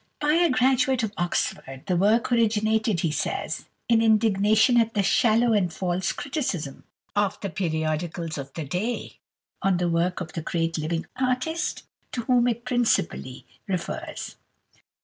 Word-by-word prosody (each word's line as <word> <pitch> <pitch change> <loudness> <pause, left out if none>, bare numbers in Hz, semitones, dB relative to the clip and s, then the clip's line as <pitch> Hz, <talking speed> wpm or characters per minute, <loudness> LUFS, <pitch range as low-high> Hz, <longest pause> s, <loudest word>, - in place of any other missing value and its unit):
By 300 0 +2
a 340 +1 +4
Graduate 255 0 +2
of 220 -1 -2
Oxford." 135 -6 -2
The 185 - 0
work 215 +7 +2
originated, 220 -4 +2
he 165 - 0
says, - - -3 0.2
"in 230 -1 +4
indignation 220 +1 +4
at 225 0 -2
the 200 - +2
shallow 230 +3 +3
and 190 -5 +2
false 180 +1 -1
criticism 245 - -4 0.3
of 205 -1 +1
the 200 - -3
periodicals 160 -1 -2
of 140 0 -7
the 160 - -4
day 195 - -3 0.4
on 195 -2 +2
the 175 0 0
work 170 +2 0
of 160 -3 -6
the 165 - -3
great 165 0 -1
living 165 +2 -2
artist 260 +6 -1 0.3
to 240 - -1
whom 245 0 +3
it 235 0 -2
principally 220 - 0 0.2
refers." 185 -3 -4
205 Hz, 150 wpm, -25 LUFS, 170-240 Hz, 0.4 s, a